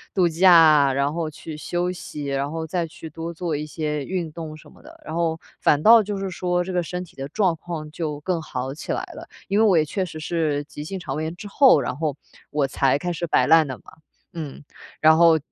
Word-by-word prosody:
度 180 -2 +4
假， 160 -4 +6
然 140 +2 0
后 165 -1 -2
去 155 +1 -9
休 175 +3 -2
息， 170 -5 -7
然 140 +1 -2
后 160 0 -4
再 175 -3 -1
去 160 0 -10
多 165 +2 -6
做 170 0 -3
一 150 +1 -3
些 150 -2 -3
运 175 -2 -3
动 155 -1 -7
什 155 - -15
么 - - -19
的， - - -16
然 155 - -6
后 165 -1 0 0.2
反 150 - +3
倒 230 +1 +8
就 205 0 -4
是 195 0 -3
说 180 -1 -1
这 185 - -5
个 180 - +1
身 180 +2 -5
体 180 - -17
的 135 0 -5
状 185 +3 +1
况 155 -2 -6
就 150 -2 -4
更 175 0 -1
好 130 -3 -4
起 150 - -6
来 - - -2
了。 - - -10 0.2
因 200 +2 +2
为 225 - +5
我 195 -5 +5
也 155 - +4
确 185 +5 -2
实 155 -3 -8
是 155 -4 -1
急 145 - -10
性 190 +5 -5
肠 - - -5
胃 155 - -2
炎 160 +2 -4
之 205 - -9
后， 270 +4 +5
然 130 - -3
后 155 -3 -1 0.3
我 150 -1 0
才 135 0 +2
开 175 +4 -3
始 170 0 -3
摆 - - +3
烂 160 -2 +5
的 130 - -5
嘛， - - -23 0.5
嗯， 150 -4 -7 0.4
然 155 0 +6
后 165 -1 +6
160 Hz, 260 characters per minute, -23 LUFS, 150-175 Hz, 0.5 s, 倒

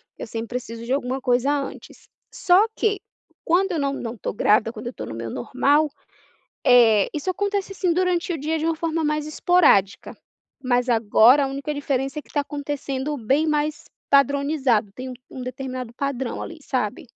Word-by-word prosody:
Eu - - -7
sempre 225 0 -5
preciso 230 -2 -6
de 250 - -1
alguma 260 -1 -1
coisa 250 +2 +1
antes. 285 -2 -5 0.2
Só 375 +4 +4
que 415 -2 0 0.4
quando 370 +3 +2
eu 330 - -1
não 280 -1 0
não 235 -3 -5
tô - - -4
grávida, 215 +2 +3
quando 240 - -9
eu 240 - -5
tô - - -7
no - - -6
meu 115 0 -5
normal, 285 - +1 0.8
eh, 230 -5 +5
isso 300 +4 -3
acontece, 400 +1 -2
assim, 370 -2 0
durante 360 -1 0
o 330 - -2
dia, 310 +3 -1
de 310 - -4
uma 330 - +1
forma 325 0 -2
mais 300 0 -1
esporádica. 305 - +2 0.5
Mas 245 0 +1
agora, 235 +4 +5
a - - 0
única 275 +2 -4
diferença 275 0 -2
é - - -7
que - - -27
está 295 - -1
acontecendo 285 0 -3
bem 270 +6 +1
mais 300 0 -1 0.3
padronizado. 280 -5 +2
Tem 255 +2 -7
um - - -6 0.2
um 260 - -8
determinado 255 -1 -6
padrão 265 -2 -3
ali, 330 -2 -8
sabe. 250 -7 -2
275 Hz, 180 wpm, -23 LUFS, 245-310 Hz, 0.8 s, eh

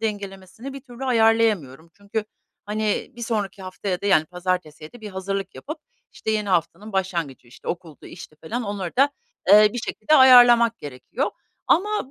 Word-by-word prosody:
dengelemesini 205 +3 -6
bir 275 - -8
türlü 250 0 -9
ayarlayamıyorum. 220 - +1
Çünkü 200 +2 -4 0.4
hani, 210 0 -2
bir 235 - -8
sonraki 205 -4 -3
haftaya 185 0 -4
da 200 - -4
yani, 175 -6 +4
pazartesiye 180 -3 -4
de 245 - -14
bir 215 - -7
hazırlık 195 +1 -4
yapıp 310 +2 -7 0.3
işte, 220 - -4
yeni 210 -2 -1
haftanın 185 +4 -1
başlangıcı, 170 -10 -3
işte, - - -12
okuldu, 170 -4 -6
işti 155 -3 -12
falan 230 +11 -5
onları 200 -4 -5
da, 275 +2 +4 0.4
eee, 210 +1 +8
bir 245 - -4
şekilde 225 +5 0
ayarlamak 245 -4 +7
gerekiyor. 130 -3 -4 0.4
Ama 415 -6 +1
205 Hz, 160 wpm, -23 LUFS, 180-230 Hz, 0.4 s, eee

